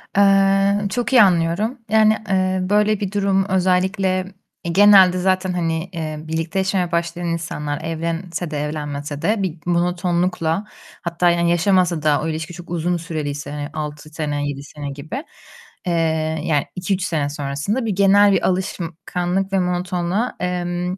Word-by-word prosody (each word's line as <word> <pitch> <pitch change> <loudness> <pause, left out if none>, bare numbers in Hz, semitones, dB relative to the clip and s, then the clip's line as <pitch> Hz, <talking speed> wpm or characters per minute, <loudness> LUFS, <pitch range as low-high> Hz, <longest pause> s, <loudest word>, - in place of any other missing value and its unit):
Eee, 195 0 +4
çok 240 +3 -2
iyi 250 - +8
anlıyorum. 185 +5 +2
Yani, 215 0 +4
eee, 185 -1 +1
böyle 210 0 +3
bir 200 -2 -3
durum 195 -1 +1
özellikle 185 0 +1 0.4
genelde 190 +1 +6
zaten, 185 0 +1
hani, 165 0 -2
eee, 160 -2 -4
birlikte 160 +3 -3
yaşamaya 190 -2 0
başlayan 170 +1 -2
insanlar 160 -3 -3
evlense 165 +1 -3
de 150 - -2
evlenmese 145 -1 -4
de 215 - +2
bir 175 -3 -3
monotonlukla, 175 +1 0 0.4
hatta 170 0 +1
yani 170 0 +2
yaşamasa 175 -1 +2
da 150 -1 +3
o 160 - -2
ilişki 160 +1 -4
çok 175 0 -11
uzun 175 +1 -1
süreliyse 150 -4 -4
hani 145 0 -5
6 150 -1 -6
sene, 150 -2 -3
7 140 0 -6
sene 145 0 -7
gibi, 155 - -6 0.6
eee, 175 - +1 0.5
yani 150 -4 +1
2-3 185 +1 -1
sene 155 -5 -1
sonrasında 145 - -2
bir 210 -4 -1
genel 200 +1 +5
bir 195 - +2
alışkanlık 180 +1 -2
ve 195 - +3
monotonluğa, 180 +4 -1
emm, 180 0 -2
175 Hz, 145 wpm, -20 LUFS, 160-190 Hz, 0.6 s, iyi